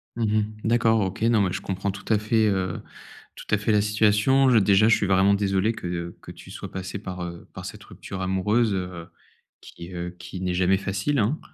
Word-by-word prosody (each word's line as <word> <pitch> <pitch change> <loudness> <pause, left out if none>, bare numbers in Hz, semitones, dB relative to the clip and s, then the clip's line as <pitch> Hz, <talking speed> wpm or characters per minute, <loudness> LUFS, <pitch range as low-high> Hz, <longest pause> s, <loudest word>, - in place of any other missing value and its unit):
Mmh 115 - -2
mh. 110 0 +2 0.2
D'accord 115 -1 +3
OK. 95 +3 -3
Non 115 -2 +4
mais 95 -2 +1
je - - -3
comprends 95 +1 -3
tout 100 0 -11
à 105 - +5
fait, 110 +1 +2
heu, 95 -3 -1 0.5
tout - - -11
à 105 - +4
fait 105 +2 -1
la 105 -1 +4
situation. 105 +6 +3
Je, 120 - +5
déjà, 100 +1 +5
je 115 - +6
suis 100 - -1
vraiment 95 +1 +4
désolé 100 +2 +1
que 85 -4 -5
que - - -10
tu - - -13
sois - - -8
passé 95 +1 -5
par, 90 -3 -7
heu, 85 -1 -8
par - - -8
cette - - -8
rupture 95 -1 -8
amoureuse, 105 +4 +1
heu, 90 -3 -5 0.5
qui, 85 +2 -11
heu, 90 0 -5
qui 90 - -8
n'est 90 -1 -1
jamais 95 +1 +3
facile, 100 +9 -1
hein. 120 +9 +1
100 Hz, 220 wpm, -24 LUFS, 95-110 Hz, 0.5 s, je